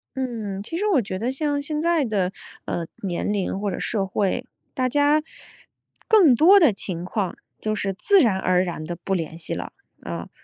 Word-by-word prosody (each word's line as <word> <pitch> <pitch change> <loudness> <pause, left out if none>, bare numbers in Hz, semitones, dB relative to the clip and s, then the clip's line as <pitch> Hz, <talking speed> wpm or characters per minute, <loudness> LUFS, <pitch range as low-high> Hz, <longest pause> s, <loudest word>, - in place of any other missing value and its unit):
嗯， 220 -7 -4
其 325 +10 -5
实 410 - -1
我 310 - +3
觉 185 -2 -5
得 240 +5 -1
像 290 +1 -1
现 300 +1 -3
在 335 -3 +2
的 195 -6 0 0.3
呃 170 - -2 0.2
年 185 +2 -1
龄 195 -1 -1
或 205 - -1
者 - - -4
社 205 -4 -1
会， 200 +6 -1 0.3
大 255 -1 0
家 290 +3 +3 0.9
更 380 - +6
多 370 - +7
的 295 - +5
情 180 -3 -5
况 190 -1 -2 0.2
就 215 0 -1
是 195 -2 -2
自 385 - +4
然 210 -6 +3
而 185 -1 +2
然 170 -3 -4
地 175 +2 -5
不 195 - -1
联 165 -3 -3
系 165 - -5
了。 - - -5 0.3
啊 - - -6
215 Hz, 205 characters per minute, -23 LUFS, 190-290 Hz, 0.9 s, 多